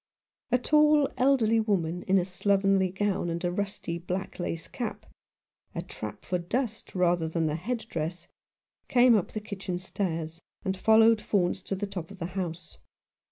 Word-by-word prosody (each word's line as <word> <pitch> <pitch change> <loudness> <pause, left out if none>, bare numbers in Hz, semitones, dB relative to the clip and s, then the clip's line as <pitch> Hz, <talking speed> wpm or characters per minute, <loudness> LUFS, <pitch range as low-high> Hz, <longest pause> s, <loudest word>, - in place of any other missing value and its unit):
A 250 - +5
tall, 300 +2 +4
elderly 250 -4 +3
woman, 180 -6 0
in 195 +1 +4
a 180 - +2
slovenly 195 0 +2
gown 190 -1 -1
and 170 +1 -2
a 175 - +1
rusty 185 -3 -3
black 180 +3 -4
lace 165 -2 -3
cap 235 -4 -5 0.3
— - - -42
a - - -3
trap - - -8
for 180 - -1
dust 220 +6 -3
rather 175 -2 +2
than 160 0 0
a - - -1
head 225 +7 -3
dress 170 -1 -4 0.3
— - - -56
came 245 -1 +6
up 200 - 0
the 215 - -2
kitchen 200 -4 -5
stairs, 165 -3 -3 0.2
and 190 0 0
followed 220 +2 +5
Faunce 185 -4 +1
to 195 - -3
the 200 +2 -2
top 185 -5 -6
of 200 - -11
the 170 - -4
house. 175 -3 -5
190 Hz, 175 wpm, -28 LUFS, 175-220 Hz, 0.3 s, came